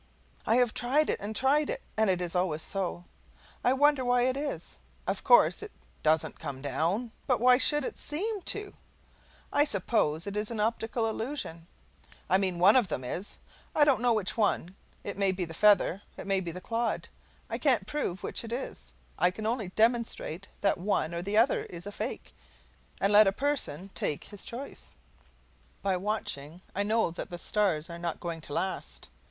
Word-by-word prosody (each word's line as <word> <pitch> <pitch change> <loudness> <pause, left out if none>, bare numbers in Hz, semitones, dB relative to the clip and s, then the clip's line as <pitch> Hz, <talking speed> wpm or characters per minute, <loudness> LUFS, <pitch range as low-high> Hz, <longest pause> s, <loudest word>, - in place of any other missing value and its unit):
I 225 - +4
have 245 -2 +3
tried 280 +6 +2
it - - -2
and 210 +2 -5
tried 285 +4 +3
it, - - -3
and 220 -1 +2
it 180 -1 +1
is 175 -1 0
always 180 -4 0
so. 185 -3 -3 0.6
I 250 - +4
wonder 290 0 +4
why 245 0 +3
it 255 +1 +2
is? 275 - -5 0.3
Of - - -2
course - - +5
it - - -7 0.3
DOESN'T 155 +1 +1
come 140 -4 -5
down, 165 - -1 0.2
but 250 -3 +2
why 250 +1 +6
should 295 +1 +3
it - - -4
SEEM 400 +7 -1
to? 415 -1 -2 0.8
I 290 - +5
suppose 185 - 0
it 200 0 -5
is 210 0 -1
an 230 -2 -4
optical 225 +1 0
illusion. 220 - -4 0.6
I 190 - +5
mean, 185 -3 0
one 190 +6 +6
of 250 -6 +4
them 130 - -3
is. 175 +11 -4 0.4
I 295 - +6
don't 275 -6 +3
know 245 -1 +3
which 205 -3 -1
one. 195 -4 0 0.3
It 200 -1 -5
may 195 -1 +4
be 185 -1 -2
the 165 - -9
feather, 205 0 +4 0.2
it - - -7
may 195 -1 +2
be 180 -2 -4
the 180 - -6
clod; 230 +3 -2 0.4
I - - -4
can't - - +3
prove 280 -12 -3
which - - -2
it 230 - -7
is, 245 +3 -5 0.3
I 180 - +5
can 215 +4 -6
only 220 -4 -1
demonstrate 220 -4 0
that 200 -3 +2
one 180 -4 0
or 170 - -2
the 200 +4 -1
other 235 +4 +3
is 175 +1 -9
a 205 - -5
fake, 215 +4 -5 0.7
and 200 +1 +2
let 210 0 +8
a - - +4
person 200 - -2
take 145 - -1
his 205 - -3
choice. 255 +4 -7 0.9
By 195 -1 +2
watching, 180 -5 -4
I 200 - -1
know 220 -2 +1
that 170 - -6
the 175 - -6
stars 175 -4 0
are 170 -1 -8
not 170 -1 -3
going 170 -2 -5
to 145 - -7
last. 190 +4 -3
205 Hz, 190 wpm, -29 LUFS, 175-245 Hz, 0.9 s, let